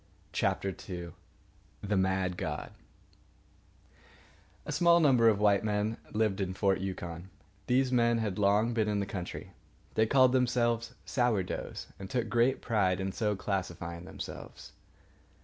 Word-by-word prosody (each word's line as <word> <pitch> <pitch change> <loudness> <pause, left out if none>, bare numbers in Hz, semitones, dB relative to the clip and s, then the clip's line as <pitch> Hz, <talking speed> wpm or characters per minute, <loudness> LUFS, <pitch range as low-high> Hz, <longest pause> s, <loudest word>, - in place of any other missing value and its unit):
CHAPTER 95 -1 0
II 85 -2 -5 0.7
THE 105 0 0
MAD 95 -1 +1
GOD - - -4 1.9
A - - -4
small 170 0 +5
number 125 -7 +5
of 105 - +2
white 100 -1 +3
men 105 +1 0
lived 105 -2 0
in 95 -1 -2
Fort 95 -2 +2
Yukon. 90 -2 -5 0.4
These 130 +1 +2
men 120 -1 +3
had 110 -4 -1
been 105 - -4
long 105 +4 +3
in 105 -2 +1
the 100 - -1
country. 90 -3 -6 0.4
They 110 0 +3
called 130 0 +5
themselves 120 -2 +1
Sour 120 -7 +1
doughs, - - -5
and 95 -1 -7
took 120 -1 -1
great 120 +3 +2
pride 95 -5 +1
in 95 0 -2
so 105 +1 0
classifying 85 -3 -4
themselves. - - -9
105 Hz, 140 wpm, -30 LUFS, 95-120 Hz, 1.9 s, small